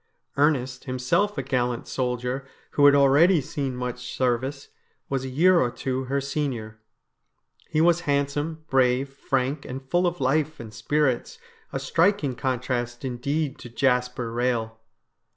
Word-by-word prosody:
Ernest, 135 Hz, -3 st, +1 dB
himself 130 Hz, +11 st, 0 dB
a 135 Hz, -, -1 dB
gallant 125 Hz, -2 st, -1 dB
soldier 125 Hz, +1 st, -2 dB, 0.2 s
who 145 Hz, -1 st, +5 dB
had 140 Hz, -, +7 dB
already 145 Hz, +6 st, +5 dB
seen 135 Hz, -1 st, -3 dB
much 125 Hz, 0 st, -5 dB
service, 130 Hz, +3 st, -1 dB, 0.4 s
was 135 Hz, -1 st, -1 dB
a 130 Hz, -, -4 dB
year 170 Hz, +7 st, +4 dB
or 125 Hz, -, +2 dB
two 130 Hz, +1 st, -3 dB
her 140 Hz, +2 st, 0 dB
senior. 135 Hz, -6 st, -3 dB, 0.9 s
He 155 Hz, -, +1 dB
was 170 Hz, +1 st, +4 dB
handsome, 145 Hz, +3 st, -1 dB
brave, 130 Hz, +1 st, +2 dB
frank, 135 Hz, +1 st, -2 dB
and 130 Hz, +1 st, -7 dB
full 175 Hz, +1 st, +3 dB
of 175 Hz, -1 st, -3 dB
life 150 Hz, +4 st, +1 dB
and 110 Hz, -2 st, -9 dB
spirits 130 Hz, +3 st, 0 dB, 0.2 s
— -, -, -32 dB
a -, -, -2 dB
striking 165 Hz, -6 st, +2 dB
contrast 125 Hz, -1 st, -2 dB
indeed 140 Hz, +4 st, -2 dB
to 120 Hz, -, -9 dB
Jasper 125 Hz, -1 st, 0 dB
Rehel. 120 Hz, -2 st, 0 dB
135 Hz, 145 wpm, -25 LUFS, 125-145 Hz, 0.9 s, had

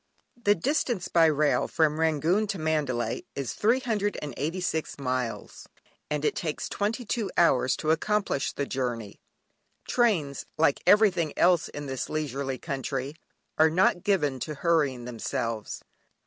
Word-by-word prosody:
(Byron). 240 Hz, -, -27 dB
The 205 Hz, 0 st, +5 dB
distance 240 Hz, -, 0 dB
by 165 Hz, -1 st, +5 dB
rail 150 Hz, -1 st, +2 dB
from 155 Hz, -1 st, +1 dB
Rangoon 160 Hz, +6 st, +2 dB
to 200 Hz, -1 st, -3 dB
Mandalay 150 Hz, -7 st, -1 dB
is 140 Hz, -3 st, -3 dB
386 190 Hz, -, -1 dB
miles, 130 Hz, -3 st, -4 dB, 0.4 s
and 150 Hz, 0 st, -1 dB
it -, -, +1 dB
takes 155 Hz, -3 st, -3 dB
twenty 225 Hz, +4 st, -2 dB
two 215 Hz, -2 st, -2 dB
hours 130 Hz, -6 st, +4 dB
to 155 Hz, -, 0 dB
accomplish 195 Hz, -2 st, 0 dB
the 140 Hz, -, -3 dB
journey. 120 Hz, -6 st, -4 dB, 0.7 s
Trains, 175 Hz, -, +1 dB
like 155 Hz, -3 st, +2 dB
everything 195 Hz, -7 st, +4 dB
else 175 Hz, -2 st, +3 dB
in 145 Hz, 0 st, -7 dB
this 130 Hz, -2 st, -4 dB
leisurely 140 Hz, -3 st, -3 dB
country, 135 Hz, -1 st, -4 dB, 0.5 s
are 160 Hz, +1 st, +6 dB
not 175 Hz, +1 st, +3 dB
given 150 Hz, -10 st, +1 dB
to 150 Hz, +4 st, -4 dB
hurrying 145 Hz, -6 st, +1 dB
themselves. 115 Hz, -2 st, -4 dB
155 Hz, 135 wpm, -27 LUFS, 135-185 Hz, 0.7 s, are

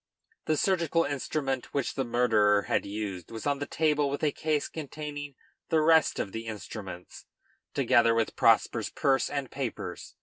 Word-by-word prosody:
] -, -, -41 dB
The 155 Hz, -, +2 dB
surgical 170 Hz, -3 st, +2 dB
instrument 140 Hz, -2 st, -3 dB
which 140 Hz, -3 st, 0 dB
the 135 Hz, -, -1 dB
murderer 110 Hz, -4 st, +3 dB
had -, -, 0 dB
used 100 Hz, -4 st, -5 dB
was 115 Hz, -1 st, -7 dB
on 145 Hz, -1 st, +1 dB
the 145 Hz, -, -3 dB
table 150 Hz, -2 st, +1 dB
with 140 Hz, -, -3 dB
the 150 Hz, -, +2 dB
case 155 Hz, -1 st, -1 dB
containing 145 Hz, -2 st, -6 dB, 0.3 s
the 160 Hz, -, +3 dB
rest 160 Hz, -1 st, +4 dB
of 100 Hz, -, -2 dB
the 115 Hz, +2 st, -6 dB
instruments, 100 Hz, -4 st, -8 dB, 0.5 s
together 115 Hz, -1 st, +4 dB
with 115 Hz, -1 st, 0 dB
Prosper's -, -, +3 dB
purse 135 Hz, -1 st, +1 dB
and 140 Hz, -3 st, -3 dB
papers. 135 Hz, -4 st, -5 dB
135 Hz, 165 wpm, -28 LUFS, 115-150 Hz, 0.5 s, rest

